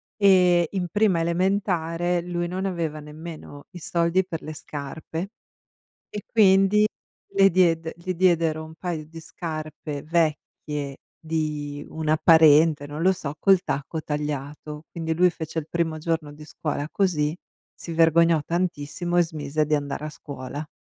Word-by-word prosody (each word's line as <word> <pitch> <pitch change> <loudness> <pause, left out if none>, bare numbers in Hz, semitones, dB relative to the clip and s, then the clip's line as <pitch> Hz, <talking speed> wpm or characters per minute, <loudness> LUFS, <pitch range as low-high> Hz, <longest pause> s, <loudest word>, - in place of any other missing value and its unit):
E 180 -4 +5
in 185 -3 -2
prima 205 -3 +2
elementare, 175 -1 0
lui 175 0 -3
non 185 +2 -3
aveva 165 -5 -2
nemmeno 150 -1 -10
i 180 - -9
soldi 170 +3 +1
per 165 -3 -5
le 155 - -7
scarpe 160 +5 -6 0.8
e 210 - -6
quindi 200 0 +5 0.4
le 195 0 +5
diede 165 -2 +2
gli 185 +2 -4
diedero 165 -3 +2
1 160 0 -12
paio 165 -2 -4
di 165 +1 -10
scarpe 155 -3 -6
vecchie 150 -3 -2 0.2
di 150 -3 -3
una 155 -1 0
parente, 155 -2 +6
non 145 +2 -6
lo 190 +2 +5
so, 150 -5 -5
col 195 0 +5
tacco 145 +3 -3
tagliato. 150 +1 -5
Quindi 160 -1 -3
lui 180 +2 +4
fece 160 -1 -6
il 150 - -12
primo 165 -2 -1
giorno 160 -2 -2
di 150 +1 -12
scuola 150 -1 -3
così, 160 -5 +1 0.4
si 170 - -8
vergognò 165 0 +4
tantissimo 175 0 -1
e - - +7
smise 155 -2 -2
di 155 - +1
andare 145 +1 -4
a - - -5
scuola. 145 0 -7
160 Hz, 145 wpm, -24 LUFS, 150-175 Hz, 0.8 s, e